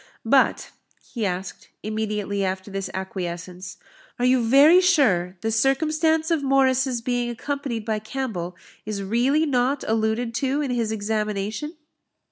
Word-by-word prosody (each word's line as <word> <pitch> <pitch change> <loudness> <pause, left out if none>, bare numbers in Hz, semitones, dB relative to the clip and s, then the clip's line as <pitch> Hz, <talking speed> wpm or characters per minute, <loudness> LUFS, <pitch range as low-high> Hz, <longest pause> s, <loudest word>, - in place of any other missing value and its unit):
"But," - - +2 0.4
he 225 -5 -1
asked, 185 +1 -5
immediately 210 -2 -2
after 190 +1 -3
this 195 -1 -4
acquiescence, 185 0 -6 0.4
"are 245 - 0
you 255 0 +4
very 285 +10 +6
sure 200 - +2
the 225 - -1
circumstance 310 +7 +1
of 325 -3 +2
Morris's 265 -2 +2
being 245 0 -1
accompanied 250 -2 -4
by 220 -2 -1
Campbell 215 -7 -4 0.3
is 210 -2 -4
really 250 +10 +2
not 265 0 +1
alluded 225 +2 0
to 270 +4 0
in 285 -4 -1
his 230 -3 -1
examination?" 215 - -3
230 Hz, 130 wpm, -23 LUFS, 200-270 Hz, 0.4 s, very